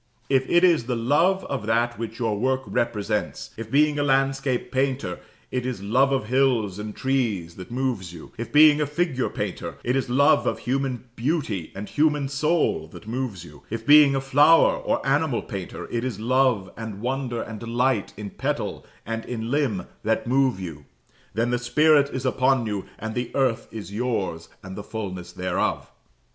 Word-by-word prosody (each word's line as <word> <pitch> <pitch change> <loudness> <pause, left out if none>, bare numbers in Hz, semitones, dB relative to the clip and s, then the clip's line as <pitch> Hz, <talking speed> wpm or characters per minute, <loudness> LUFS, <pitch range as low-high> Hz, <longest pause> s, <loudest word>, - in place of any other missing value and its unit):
If 135 -1 +2
it 175 +1 +4
is 170 -9 +4
the 125 0 -1
love 155 +11 +2
of 105 - -4
that 120 +1 +1
which 115 0 -5
your 115 -4 0
work 130 +5 0
represents 105 -2 -2
if, 115 -1 -7
being 150 +3 +3
a - - +2
landscape 135 -2 +1
painter, 130 -8 -1 0.3
it 125 -1 -1
is 125 -6 -4
love 130 +7 +3
of 135 -5 0
hills 120 -5 +1
and 105 0 -6
trees 115 -11 -1
that 90 - -9
moves 120 -8 -2
you 85 -2 -11
if, 115 - -6
being 150 0 +7
a 150 - +1
figure 150 -3 -1
painter, - - -4
it 125 - 0
is 135 -2 -1
love 140 +3 +4
of - - 0
human 130 -1 -2
beauty 115 - -2
and 100 +2 -6
human 150 -2 +1
soul 150 - +1
that 80 - -13
moves 110 -6 -4
you 75 -3 -14
if, 115 - -5
being 145 -1 +7
a 135 - 0
flower 145 +5 +5
or - - -2
animal 140 -2 +1
painter, 95 -3 -6
it 120 0 -1
is 125 -6 -3
love, 120 -5 +2
and 110 -3 -6
wonder, 125 0 -2
and 110 -1 -6
delight 120 -1 0
in 100 -1 -6
petal - - -3 0.2
and 115 +1 -3
in 115 -1 -4
limb 135 -9 0 0.2
that 110 +1 0
move 130 -3 +2
you, 80 -6 -7 0.5
then 115 +2 +1
the 125 - +1
Spirit 140 +4 +4
is 130 -1 -4
upon 130 -1 +2
you, 105 -3 -3
and 110 +1 -5
the 120 0 -2
earth 130 -4 +1
is 105 -3 -8
yours, 105 -8 -2
and 95 0 -8
the - - -5
fulness 95 -6 -6
thereof. 90 0 -2
125 Hz, 180 wpm, -24 LUFS, 110-135 Hz, 0.5 s, being